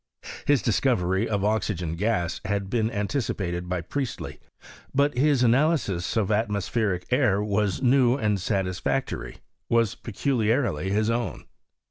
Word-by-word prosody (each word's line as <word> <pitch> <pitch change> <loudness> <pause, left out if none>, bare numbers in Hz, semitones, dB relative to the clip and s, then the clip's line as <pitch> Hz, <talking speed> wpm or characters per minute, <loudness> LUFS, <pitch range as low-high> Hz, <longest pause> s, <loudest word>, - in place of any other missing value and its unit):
His 145 -3 +3
discovery 100 -4 +1
of 100 -2 0
oxygen 105 -6 -1
gas 90 -2 -1
had 100 0 -2
bees 115 -2 +1
anticipated 100 -6 -2
by 90 -1 -1
Priestley; 130 - -4 0.6
but 140 0 +2
his 135 0 +3
analysis 120 - +2
of 105 -4 +1
atmo 105 -1 +1
spheric 100 -3 -1
air 125 -7 +3
was 105 +1 0
new 130 0 +4
and 105 -6 0
satisfactory 95 +7 -2
— - - -53
was 115 -2 +2
peculiarly 115 - 0
his 105 +3 +1
own. 120 0 -3
110 Hz, 130 wpm, -25 LUFS, 95-125 Hz, 0.6 s, new